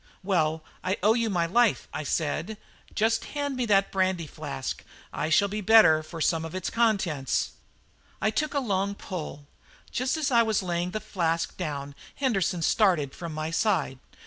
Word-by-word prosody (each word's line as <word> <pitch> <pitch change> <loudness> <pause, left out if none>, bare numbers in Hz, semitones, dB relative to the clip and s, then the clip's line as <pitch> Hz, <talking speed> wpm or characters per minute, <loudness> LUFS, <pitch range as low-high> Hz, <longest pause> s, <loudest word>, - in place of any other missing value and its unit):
"Well, 160 -5 +1 0.2
I 185 +2 0
owe 215 +2 +6
you 230 -1 0
my 175 -4 +1
life," 230 +5 +2
I - - -3
said; 160 +7 -2 0.4
"just 225 +1 +2
hand 285 -1 -1
me 250 -2 -1
that 195 -2 +3
brandy 185 -3 0
flask, 70 - -5 0.3
I 155 - -2
shall 200 +5 +4
be 210 +2 -4
the - - -11
better 215 -9 +7
for 165 +1 -9
some 160 0 +1
of 165 +2 -6
its 185 - -3
contents." 190 - +1 0.7
I 215 - +1
took 300 +6 -1
a - - +3
long 200 -5 -1
pull. 155 -7 -7 0.5
Just 255 +5 0
as 295 -3 0
I 235 -2 +6
was 220 -3 +1
laying 175 0 -1
the 215 +4 -3
flask 165 -5 -1
down 145 -5 -4 0.2
Henderson 195 -10 0
started 170 - +2
from 170 -2 -6
my 155 +1 -3
side. 165 -8 0
185 Hz, 175 wpm, -27 LUFS, 160-220 Hz, 0.7 s, better